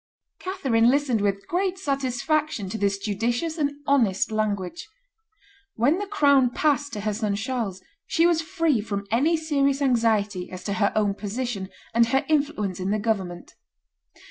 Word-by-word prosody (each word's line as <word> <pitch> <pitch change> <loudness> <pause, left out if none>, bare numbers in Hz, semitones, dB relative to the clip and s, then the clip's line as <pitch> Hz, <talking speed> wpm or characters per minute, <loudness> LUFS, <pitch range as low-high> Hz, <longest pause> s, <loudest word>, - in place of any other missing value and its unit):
Catherine 265 -12 +2
listened 265 -5 +2
with 200 -1 -1
great 370 +1 0
satisfaction 275 - -1
to 220 - -4
this 200 -1 +1
judicious 235 - -2
and 285 -1 +1
honest 225 -9 +2
language. 200 -5 -2 0.9
When 280 - +2
the 410 - -4
crown 280 -10 +4
passed 285 +2 +1
to 210 - -4
her 215 0 -1
son 210 -1 -1
Charles 220 -4 -3 0.2
she 335 -1 +3
was 340 -2 +3
free 325 - +1
from 200 -1 -4
any 295 +9 +3
serious 280 -3 +1
anxiety 220 -8 +1
as 185 0 -8
to 200 - -2
her 200 - +3
own 210 -2 +2
position 205 -1 -4 0.2
and 230 0 +4
her 265 +3 +1
influence 280 - 0
in 185 +1 -2
the 210 - +1
government. 195 -5 -3
235 Hz, 155 wpm, -25 LUFS, 200-290 Hz, 0.9 s, crown